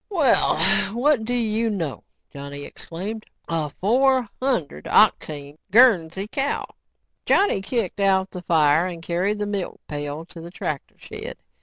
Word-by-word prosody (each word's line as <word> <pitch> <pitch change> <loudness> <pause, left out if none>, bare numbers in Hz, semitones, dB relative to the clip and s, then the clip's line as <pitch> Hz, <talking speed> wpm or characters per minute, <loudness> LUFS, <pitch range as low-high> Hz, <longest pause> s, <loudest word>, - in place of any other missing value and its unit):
"Well, 320 - +3 0.4
what 255 -2 +2
do 245 - -2
you 225 -1 0
know," 170 -10 -3 0.3
Johnny 140 0 -7
exclaimed, 205 +6 -7 0.2
"a 160 -3 -1
four 250 - +2
hundred 200 - -1
octane 145 0 +2
Guernsey 195 -5 +4
cow!" 275 +5 -1 0.6
Johnny 390 - +3
kicked 205 -2 -2
out 190 -1 +2
the 180 - -7
fire 160 -1 +3
and 170 -2 -7
carried 180 +5 -1
the 205 - -2
milk 200 -3 -4
pail 145 +2 -5
to 170 -1 -11
the 170 - -8
tractor 155 -5 -5
shed. - - -8
190 Hz, 140 wpm, -23 LUFS, 160-230 Hz, 0.6 s, Guernsey